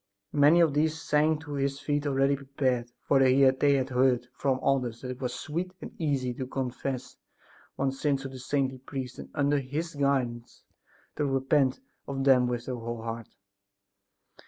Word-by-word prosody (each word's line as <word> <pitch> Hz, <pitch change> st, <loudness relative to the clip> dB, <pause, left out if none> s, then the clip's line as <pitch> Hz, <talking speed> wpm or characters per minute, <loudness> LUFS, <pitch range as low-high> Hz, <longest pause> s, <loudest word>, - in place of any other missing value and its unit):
Many 150 Hz, +4 st, +6 dB
of 160 Hz, -4 st, +4 dB
these 155 Hz, +2 st, +1 dB
sank 155 Hz, 0 st, +1 dB
at 145 Hz, -1 st, -3 dB
his 140 Hz, 0 st, -1 dB
feet 145 Hz, 0 st, -1 dB
already 135 Hz, 0 st, +2 dB
prepared, 130 Hz, -3 st, -1 dB
for 140 Hz, -, +3 dB
they 130 Hz, 0 st, +5 dB
had 130 Hz, -1 st, +4 dB, 0.3 s
heard 125 Hz, -1 st, +2 dB
from 135 Hz, -1 st, 0 dB
others 125 Hz, -4 st, 0 dB
that 125 Hz, -, -5 dB
it 125 Hz, -, -8 dB
was 125 Hz, -2 st, -1 dB
sweet 170 Hz, +8 st, -4 dB
and -, -, -8 dB
easy 135 Hz, -5 st, 0 dB
to 130 Hz, +1 st, -5 dB
confess 130 Hz, 0 st, -4 dB, 0.6 s
one's 135 Hz, 0 st, -1 dB
sins 140 Hz, -3 st, +1 dB
to 135 Hz, -, -5 dB
the 130 Hz, -1 st, -9 dB
saintly 130 Hz, 0 st, -1 dB
priest 130 Hz, -1 st, -6 dB
and -, -, -8 dB
under 145 Hz, -1 st, +2 dB
his 150 Hz, +5 st, -4 dB
guidance, 130 Hz, -5 st, -1 dB, 0.5 s
to 150 Hz, -, +1 dB
repent 135 Hz, -, +2 dB, 0.3 s
of 135 Hz, -1 st, -2 dB
them 130 Hz, -2 st, +5 dB
with 120 Hz, -1 st, -3 dB
their 125 Hz, -1 st, -3 dB
whole 115 Hz, 0 st, -5 dB
heart. 115 Hz, -1 st, -5 dB
135 Hz, 170 wpm, -28 LUFS, 125-145 Hz, 0.6 s, Many